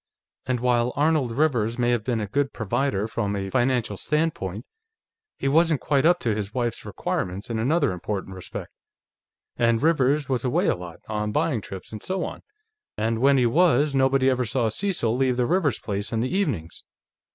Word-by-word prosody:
And 130 -1 0
while 120 0 +1
Arnold 150 -3 +2
Rivers 120 -4 +1
may 120 -1 +2
have 120 -3 0
been 120 -1 -1
a 105 - -2
good 140 +7 -1
provider 110 -1 -1
from 105 -3 -2
a 95 -1 -4
financial 120 -3 +1
standpoint, 135 - -1 0.7
he - - -2
wasn't 160 +1 +3
quite 145 +1 +2
up 175 +1 +5
to 115 - +1
his 105 +1 -4
wife's 120 -2 -2
requirements 95 +5 -3
in 110 - -1
another 145 - +2
important 95 +2 -4
respect. 95 -1 -7 0.9
And 115 -1 +3
Rivers 145 -2 +2
was 130 -3 -1
away 125 - +1
a - - +2
lot, 85 -2 -10
on 105 -1 -2
buying 150 -2 0
trips 95 -1 -8
and 110 - -6
so 190 +1 -2
on, - - -7 0.6
and 110 +1 0
when 140 +2 +4
he 125 - +3
was, 150 +1 +3
nobody 135 0 +3
ever 130 -1 +2
saw 120 0 0
Cecil 120 - 0
leave 130 -1 +1
the 125 - +2
Rivers 160 - +1
place 100 0 -4
in 115 - 0
the 130 +10 -1
evenings. 110 - -2
120 Hz, 185 wpm, -24 LUFS, 110-140 Hz, 0.9 s, up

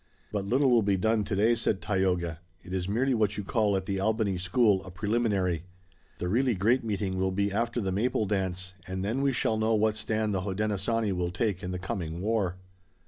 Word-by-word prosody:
"But 100 -2 -2
little 130 +5 +3
will 120 -2 +5
be 100 -2 +2
done 110 +2 +2
today," 105 +4 +2
said 115 -4 0
Tayoga. 90 -5 0 0.2
"It 90 - -8
is 95 0 -1
merely 130 +6 +1
what 105 -4 +1
you 105 - -3
call 105 0 +1
at 95 - -4
the 95 0 -2
Albany 110 -1 +1
school 95 +1 +3
a 95 - -9
preliminary. 100 -4 0 0.5
The 90 - -3
really 120 +5 +2
great 115 +7 +2
meeting 100 -4 -2
will 95 0 +1
be 100 +1 0
after 115 +3 -1
the 95 -4 -1
Maple 110 +3 +1
Dance, 95 -2 -2
and 95 +1 -3
then 115 +6 -1
we 140 0 +3
shall 115 -3 0
know 110 +1 +2
what 110 0 +2
stand 110 0 -1
the 95 - 0
Hodenosaunee 105 +2 -1
will 90 -1 -1
take 95 +1 -1
in 90 - -4
the 90 - -3
coming 90 -4 -4
war." 100 -3 0
100 Hz, 205 wpm, -28 LUFS, 95-110 Hz, 0.5 s, will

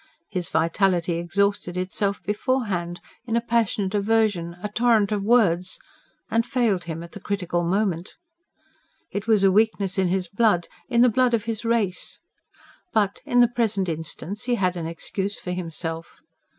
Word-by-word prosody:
His 180 -4 -2
vitality 170 +1 +1
exhausted 195 0 0
itself 195 +1 -1
beforehand 205 -4 -1 0.3
in 225 - 0
a - - +4
passionate 225 -4 0
aversion, 205 -5 +1
a - - 0
torrent 220 -1 +3
of 210 -1 0
words 195 -5 +3 0.5
and 230 0 +3
failed 235 -7 0
him 165 0 -5
at 170 - -11
the 205 - -9
critical 180 -4 -1
moment. 185 -1 -1 1.0
It 200 +2 -4
was 215 -3 +4
a 195 - +6
weakness 200 -2 +2
in 190 - +3
his 180 0 0
blood 200 -2 +2 0.2
in 235 -2 +3
the 250 - +7
blood 245 +1 +3
of 225 -1 -3
his 225 0 -3
race. 230 -6 -1 0.7
But 205 -3 +1
in 245 0 +4
the 240 - +7
present 220 -5 0
instance, 165 +6 -5
he 245 -1 +2
had 185 -4 +1
an 165 -2 -3
excuse 195 +4 -3
for 180 - -5
himself. 165 -2 -5
200 Hz, 160 wpm, -24 LUFS, 175-225 Hz, 1.0 s, the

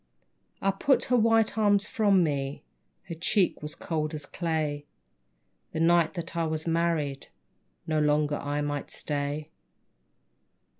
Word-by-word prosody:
I 195 - +3
put 265 +8 +2
her 250 - +2
white 225 -2 +3
arms 205 -1 +4
from 200 -6 +3
me, 140 -3 -2 0.4
Her 170 - -7
cheek 180 +3 +1
was 150 0 -6
cold 155 -2 -3
as 150 -1 -6
clay. 155 -4 -2 0.9
The 160 - -2
night 170 +1 +3
that 170 0 -6
I 165 -1 +1
was 155 0 -2
married 165 -4 0 0.6
No 155 -1 0
longer 150 0 +2
I 145 +1 -2
might 145 -1 -3
stay. 145 +1 -3
160 Hz, 135 wpm, -28 LUFS, 150-185 Hz, 0.9 s, arms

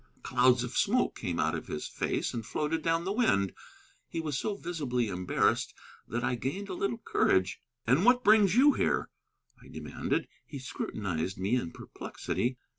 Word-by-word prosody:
Clouds 125 0 +4
of 125 +1 -5
smoke 250 +5 +2
came 85 -2 -3
out 80 - +2
of 80 - -4
his 75 - -4
face - - -2
and 115 -2 -3
floated 150 +7 -1
down 165 +1 +1
the 195 - 0
wind. 100 - +2 0.6
He 165 - -3
was 155 -4 -2
so 205 +9 -1
visibly 140 - -2
embarrassed 90 -1 +1 0.3
that 120 +1 -2
I - - +1
gained 140 - -3
a - - -3
little 200 +5 -1
courage. 95 - +1 0.2
"And 135 +10 +3
what 245 +2 +5
brings 210 -2 +6
you 280 +4 +7
here?" - - 0 0.5
I - - -15
demanded. - - -3 0.2
He 145 - -8
scrutinized 100 -8 -3
me 100 +6 +1
in 120 -9 -1
perplexity. 125 +1 -4
130 Hz, 170 wpm, -30 LUFS, -, 0.6 s, you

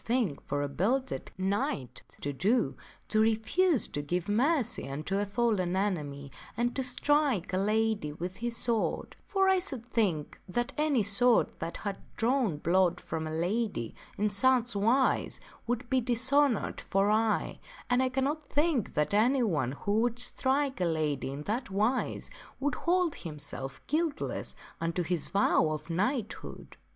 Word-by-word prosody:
thing 230 - +1
for 145 +1 -1
a - - -1
belted 240 - -1
knight 185 - -2 0.2
to 145 - -3
do, 215 - +1 0.3
to 215 - +1
refuse 225 +9 +2
to 145 - -4
give 175 +4 -2
mercy 240 - +1
unto 155 +8 -2
a 205 - 0
^^^ - - -14
fallen 205 -5 +1
enemy 150 -8 -2 0.3
and 240 +1 0
to 265 - 0
strike 255 - +2
a - - +2
lady 215 -4 +1
with 180 +5 -6
his 235 0 -3
sword; 230 -2 -1
for 390 -1 +2
I 380 -1 +5
should 270 - -2
think 180 -10 0
that 240 +6 -1
any 295 -6 +2
sword 230 +5 +3
that 165 +1 -4
had 200 -2 -4 0.2
drawn 235 - +1
blood 175 +2 +2
from 160 -1 -4
a - - -4
lady 175 - -1 0.2
in 210 +1 +1
such 245 +2 +3
wise 230 +7 +2 0.3
would 245 0 -1
be 260 +1 +2
dishonored 255 +1 +2
for 195 +2 +1
aye; 220 0 +1 0.3
and 250 +1 +3
I 260 - +2
cannot 280 +3 -1
think 295 - +1
that 150 +4 +1
anyone 210 - +2
who 205 +8 0
would 240 0 0
strike 265 0 0
a - - +3
lady 155 -5 0
in 140 +2 -5
that 225 - -2
wise 215 +6 0 0.3
would 290 +1 0
hold 350 -2 +1
himself 145 -4 -6
guiltless 310 -1 -2 0.2
unto 165 +2 -1
his 170 -2 -1
vow 195 -5 +3
of 155 +2 -4
knighthood." 215 +6 -3
215 Hz, 155 wpm, -30 LUFS, 175-255 Hz, 0.3 s, I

